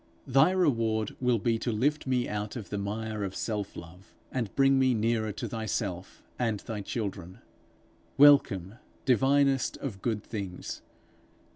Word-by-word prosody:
Thy 135 +4 +5
reward 115 - +1
will 125 -2 +3
be 115 +1 0
to 120 - -1
lift 135 +7 0
me 125 -2 +1
out 105 0 -4
of 115 -5 -7
the 100 - -2
mire 110 +1 -3
of 95 -1 -4
self 105 -3 -3
love, 90 +3 -12 0.2
and 120 -5 -2
bring 135 -1 +4
me 130 -2 +3
nearer 110 0 0
to - - -5
thyself 105 -5 -4 0.2
and 115 -4 0
thy 110 -3 -5
children: 95 -4 -5 0.8
welcome, 120 -8 +5 0.3
divinest 135 +1 +3
of 105 -9 -6
good 110 -4 -1
things! 100 -5 -6
110 Hz, 145 wpm, -29 LUFS, 100-130 Hz, 0.8 s, Thy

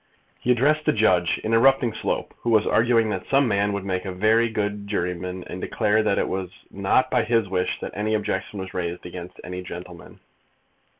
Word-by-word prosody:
"He 125 - +1
addressed 150 +5 +2
the - - +3
judge, 90 -5 +2
interrupting 120 +1 +3
Slope, - - -3
who 120 - -2
was 110 -2 +4
arguing 115 -1 +3
that 95 -2 -4
some 135 -1 +3
man 100 -1 +1
would 100 -1 -3
make 95 -1 -2
a 95 - -4
very 110 +5 +3
good 105 -1 -3
juryman, 90 0 -3
and 90 +1 -7
declared 110 -1 +1
that 100 - +2
it - - +1
was 95 -1 -3 0.2
not 100 +7 +1
by 125 - +3
his 115 -3 +1
wish 90 -1 -1
that - - -5
any 110 +1 -1
objection 100 -1 -3
was 95 0 -6
raised 90 -1 -4
against 90 0 -8
any 90 0 -6
gentleman." 90 0 -10
100 Hz, 190 wpm, -24 LUFS, 90-115 Hz, 0.2 s, was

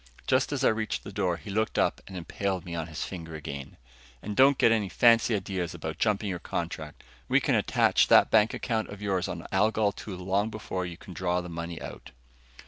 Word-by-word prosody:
Just - - +2
as - - -1
I - - +6
reached 110 -1 -2
the - - -8
door, 95 -4 0
he 100 - -9
looked 110 +2 0
up - - +1
and 95 - -7
impaled 95 +1 -3
me 85 - -6
on 80 -2 -3
his 80 -1 -5
finger 80 -4 -7
again. 70 -3 -7 0.5
"And 105 0 -4
don't 135 +2 +6
get 115 - +5
any 105 -4 +1
fancy 115 0 +4
ideas 95 -3 -3
about - - -6
jumping 105 0 +1
your 90 -3 -3
contract. 80 -4 -5 0.2
We - - +4
can - - 0
attach - - +3
that - - +6
bank 110 0 +5
account 110 -3 -2
of 100 0 -8
yours 95 -2 0
on 85 -1 -6
Algol 105 +1 +2
II 100 - -4
long 95 +4 0
before 95 -4 -4
you 85 -1 -8
could 90 - -11
draw 90 +1 0
the 90 0 -6
money 85 0 -5
out." - - -9
95 Hz, 215 wpm, -28 LUFS, 85-105 Hz, 0.5 s, I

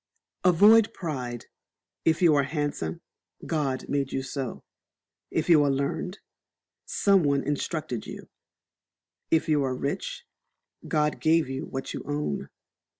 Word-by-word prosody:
Avoid 205 +5 +6
Pride. 125 -8 -4 0.6
If 160 +2 +2
you 165 -3 +6
are 145 - +4
handsome, 145 - -3 0.4
God 140 -5 -1
made 140 -2 -1
you 135 - -2
so; 130 -2 -5 0.7
if - - -1
you 160 -4 +6
are 145 - +2
learned, 140 +8 -2 0.7
some 200 -2 +3
one 140 -2 +1
instructed 145 -3 -3
you; - - -9 1.0
if 160 - +2
you 150 -3 +3
are 130 -1 -1
rich, 140 +2 -4 0.6
God 150 0 +1
gave 160 -1 +3
you 135 0 -4
what 135 0 -5
you - - -5
own. 145 - -2
145 Hz, 130 wpm, -27 LUFS, 135-160 Hz, 1.0 s, Avoid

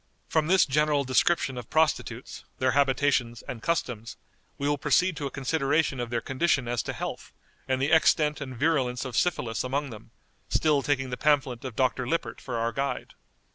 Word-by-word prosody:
From 155 -1 +1
this 185 +1 +5
general 150 0 +2
description 130 0 +1
of 120 - -10
prostitutes, 160 -1 0
their 130 0 +2
habitations, 135 -3 +1
and 115 - -7
customs, 125 -9 -2 0.4
we 140 - -2
will 145 -1 0
proceed 180 +4 +2
to 145 - -2
a - - -5
consideration 140 +1 0
of 120 -1 -3
their 120 0 -1
condition 135 -1 0
as 120 -1 0
to - - -5
health, - - -6 0.4
and 130 0 0
the 140 +3 0
extent 150 -2 +3
and 130 -3 -6
virulence 130 -4 +1
of 130 - -5
syphilis 120 -10 0
among 135 +2 -2
them, 110 +1 -11 0.4
still 150 -3 +2
taking 135 -2 -1
the 125 - -3
pamphlet 140 -5 +1
of 130 -4 -6
Dr. 130 0 0
Lippert 165 +5 -2
for 125 - -5
our 115 0 0
guide. 135 +3 -3
135 Hz, 180 wpm, -27 LUFS, 125-150 Hz, 0.4 s, this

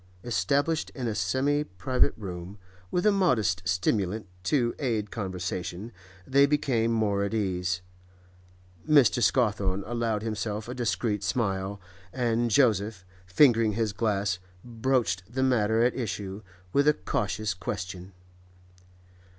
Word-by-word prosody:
Established 140 - 0
in 130 -4 -3
a 110 - -1
semi 130 +10 +1
private 125 +4 0
room, 95 -1 -7 0.3
with 180 - 0
a 210 - +6
modest 125 - +2
stimulant 95 +3 0 0.2
to 120 0 +2
aid 110 -7 -1
conversation, 95 0 -4 0.3
they 140 +5 +4
became 130 -6 +1
more 105 -3 +1
at 100 +2 -2
ease; 90 -3 -1 1.1
Mr. 135 -5 +5
Scawthorne 100 -6 +1
allowed 115 -2 -1
himself 110 -1 -3
a 125 - -4
discreet 115 -4 -1
smile, 100 -1 -1 0.3
and 120 -1 0
Joseph, 105 -5 +2 0.2
fingering 115 +1 +4
his 110 -1 -1
glass, 100 -3 0 0.3
broached 115 -6 -1
the 130 +2 0
matter 115 -3 +3
at 125 - +3
issue 105 -5 -4 0.3
with 140 +1 +3
a 150 - +5
cautious 100 +2 -2
question. 95 -1 -6
110 Hz, 120 wpm, -27 LUFS, 95-125 Hz, 1.1 s, a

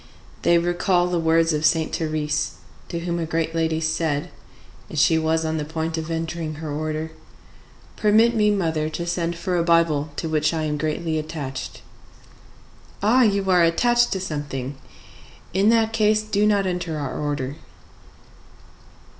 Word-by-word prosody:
They 170 - +4
recall 175 +1 +1
the 180 -1 0
words 165 0 +3
of 150 0 -1
Saint 160 0 +2
Thérèse, 155 -2 -1 0.4
to 170 - -4
whom 170 0 -2
a 165 - -2
great 165 0 -1
lady 160 -1 0
said, 160 -2 -1 0.6
as - - -7
she 160 +2 +4
was 160 0 0
on 160 0 -1
the 150 - -2
point 160 +1 -3
of 160 0 -4
entering 165 -1 -3
her 155 0 -6
order, 155 +1 -3 0.9
"Permit 220 +3 +4
me, 210 -2 +3
mother, 160 -6 0
to 170 +2 -4
send 170 -1 -1
for 175 +1 -2
a 170 - +2
Bible 165 -3 +2
to 165 - -3
which 155 +1 +1
I 160 - -1
am 150 -1 -2
greatly 155 +1 -1
attached." 145 -4 -6 1.2
"Ah, 235 +5 +5
you 200 -4 +2
are 180 -1 +5
attached 240 +8 +3
to 190 - -2
something! 145 -6 -4 0.8
In 195 +3 +3
that 225 -1 +3
case, 215 -1 +3
do 210 -1 +1
not 200 -2 +2
enter 180 -3 -2
our 140 -3 -4
order!" 145 -1 -3
165 Hz, 160 wpm, -23 LUFS, 155-180 Hz, 1.2 s, Ah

